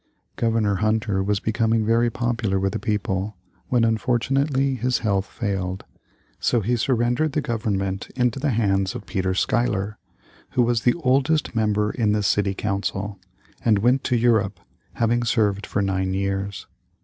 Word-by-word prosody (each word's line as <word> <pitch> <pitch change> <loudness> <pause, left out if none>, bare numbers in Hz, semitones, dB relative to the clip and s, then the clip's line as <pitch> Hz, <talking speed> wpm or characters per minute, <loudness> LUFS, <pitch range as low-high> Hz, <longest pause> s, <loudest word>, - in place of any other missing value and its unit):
Governor 110 -4 +1
Hunter 110 -2 +1
was 100 +1 0
becoming 110 +1 +1
very 115 +2 +3
popular 115 -4 -1
with 95 0 -1
the 110 - -2
people, 105 -2 -2 0.3
when 120 -2 +2
unfortunately 135 +4 +1
his 125 0 0
health 100 -1 +1
failed. 95 -4 -3 0.5
So 120 - +2
he 120 +5 +1
surrendered 120 +5 +1
the 150 - +1
government 100 -6 -2
into 125 0 +1
the 145 +2 0
hands 100 -5 +1
of - - -7
Peter 95 -1 -1
Schuyler, 105 -1 0 0.5
who 125 - +3
was 120 -1 +1
the 120 - +3
oldest 140 +4 +2
member 105 -1 +1
in 110 -4 +1
the 105 -1 0
City 100 0 +1
Council, 100 0 -3 0.4
and 110 -3 +4
went 125 +6 +2
to 125 - +2
Europe, 110 -5 +2 0.3
having 120 +1 +1
served 105 -3 +1
for 100 - 0
nine 95 -1 -1
years. 100 0 -2
110 Hz, 150 wpm, -23 LUFS, 100-120 Hz, 0.5 s, and